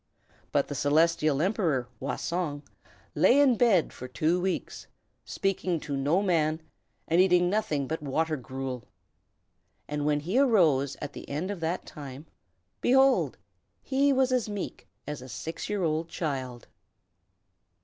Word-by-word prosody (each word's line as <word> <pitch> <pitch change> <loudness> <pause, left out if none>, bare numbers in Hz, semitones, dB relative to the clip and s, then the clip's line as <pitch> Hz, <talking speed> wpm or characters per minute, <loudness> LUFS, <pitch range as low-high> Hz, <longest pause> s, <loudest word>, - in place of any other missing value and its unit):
But 145 - +1
the - - -5
Celestial 155 +1 +2
Emperor, 170 - 0
Wah 135 - -2
Song, 165 -4 -3 0.5
lay 265 - +5
in 275 -4 +5
bed 215 -8 +3
for 125 - -8
two 155 +8 0
weeks, 185 0 -3 0.4
speaking 185 -3 -1
to 145 -3 -4
no 145 +8 +1
man, 160 -4 +1 0.5
and 170 +2 +4
eating 180 -1 +4
nothing 155 -10 0
but 160 +2 -3
water 155 +3 0
gruel. 130 -2 -6 1.0
And 150 0 -3
when 150 0 +1
he 185 - 0
arose, 165 - +3
at 145 - -5
the - - -10
end 160 +8 -2
of 200 - -5
that 165 +2 -2
time, 140 -1 -9 0.6
behold! 265 +1 +4 0.5
he 280 +1 +2
was 260 -1 +2
as 250 -4 +1
meek 205 -2 -6 0.2
as 150 -3 -5
a 130 - -10
six 160 - -6
years 205 -4 0
old 160 +1 -1
child. 130 -8 -4
160 Hz, 145 wpm, -28 LUFS, 145-190 Hz, 1.0 s, lay